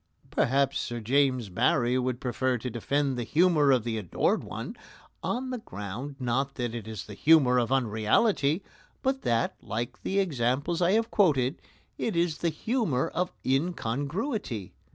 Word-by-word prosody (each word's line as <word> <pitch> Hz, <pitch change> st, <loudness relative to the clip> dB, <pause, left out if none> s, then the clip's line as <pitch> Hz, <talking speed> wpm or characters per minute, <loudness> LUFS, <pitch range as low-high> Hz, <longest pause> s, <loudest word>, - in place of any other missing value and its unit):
Perhaps 135 Hz, +2 st, +2 dB
Sir 120 Hz, 0 st, -3 dB
James 130 Hz, -1 st, +1 dB
Barrie 120 Hz, +4 st, +2 dB
would 125 Hz, -1 st, -1 dB
prefer 130 Hz, 0 st, 0 dB
to 125 Hz, +2 st, -5 dB
defend 135 Hz, +3 st, 0 dB
the -, -, -1 dB
humour 155 Hz, +3 st, +3 dB
of 130 Hz, -4 st, +4 dB
The 115 Hz, -1 st, -2 dB
Adored 95 Hz, -6 st, 0 dB
One -, -, -6 dB, 0.5 s
on 255 Hz, +2 st, -2 dB
the 250 Hz, -, -3 dB
ground, 125 Hz, -, -6 dB
not 135 Hz, +2 st, -1 dB
that 120 Hz, -3 st, -3 dB
it 115 Hz, -3 st, -6 dB
is 110 Hz, -4 st, -6 dB
the 105 Hz, -, -9 dB
humour 135 Hz, -1 st, +5 dB
of 120 Hz, +1 st, -1 dB
unreality, 135 Hz, -, +2 dB, 0.4 s
but 265 Hz, 0 st, 0 dB
that, 115 Hz, -1 st, +1 dB
like 120 Hz, +3 st, -4 dB
the 195 Hz, -, -2 dB
examples 145 Hz, -1 st, 0 dB
I 175 Hz, +2 st, +4 dB
have 225 Hz, +1 st, +1 dB
quoted, 145 Hz, -, +2 dB, 0.4 s
it 220 Hz, -, -1 dB
is 170 Hz, -2 st, +1 dB
the 170 Hz, -, +1 dB
humour 165 Hz, -, 0 dB
of 180 Hz, 0 st, -1 dB
incongruity. 140 Hz, -, -2 dB
135 Hz, 155 wpm, -28 LUFS, 120-170 Hz, 0.5 s, humour